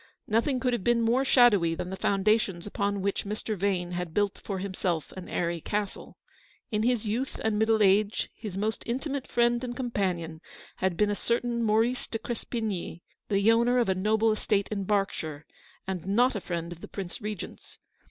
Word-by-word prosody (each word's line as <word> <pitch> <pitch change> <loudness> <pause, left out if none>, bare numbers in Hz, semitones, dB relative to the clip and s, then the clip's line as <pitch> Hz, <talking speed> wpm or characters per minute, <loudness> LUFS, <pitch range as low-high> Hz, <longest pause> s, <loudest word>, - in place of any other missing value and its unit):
Nothing 235 +5 +2
could 250 -1 +1
have 235 - -1
been 235 +1 +3
more 240 +4 +3
shadowy 210 -11 +5
than 180 +2 -4
the - - -3
foundations 195 -2 +1
upon 200 -1 -1
which 200 0 0
Mr. 210 +1 -3
Vane 185 -2 0
had 175 -2 -4
built 205 -1 +1
for 195 - -3
himself 185 -4 -2
an 185 -1 -9
airy 170 -1 -1
castle. 205 +3 -4 0.5
In 210 -1 +1
his 235 -1 +1
youth 235 +6 -2
and 220 -1 +1
middle 220 -1 +4
age 205 +2 +3
his 210 -4 -7
most 215 +2 -1
intimate 270 +3 -2
friend 240 +1 +2
and 245 -1 -4
companion 185 -10 -2 0.4
had 185 -2 0
been 210 -1 +3
a - - 0
certain 235 +2 0
Maurice 225 +3 +2
de 225 - -3
Crespigny, 220 -7 -4 0.3
the 200 +2 +4
owner 235 +2 +3
of 240 -5 +2
a - - +4
noble 215 +4 +2
estate 205 -2 +1
in 200 -2 -2
Berk 200 -1 +2
shire, 155 -1 -6 0.4
and 190 -2 -4
not 245 +6 +4
a 205 - -2
friend 170 -1 -4
of 175 0 -9
the - - -8
Prince 195 +2 -6
Regent's. 210 -3 -7
210 Hz, 185 wpm, -28 LUFS, 190-230 Hz, 0.5 s, shadowy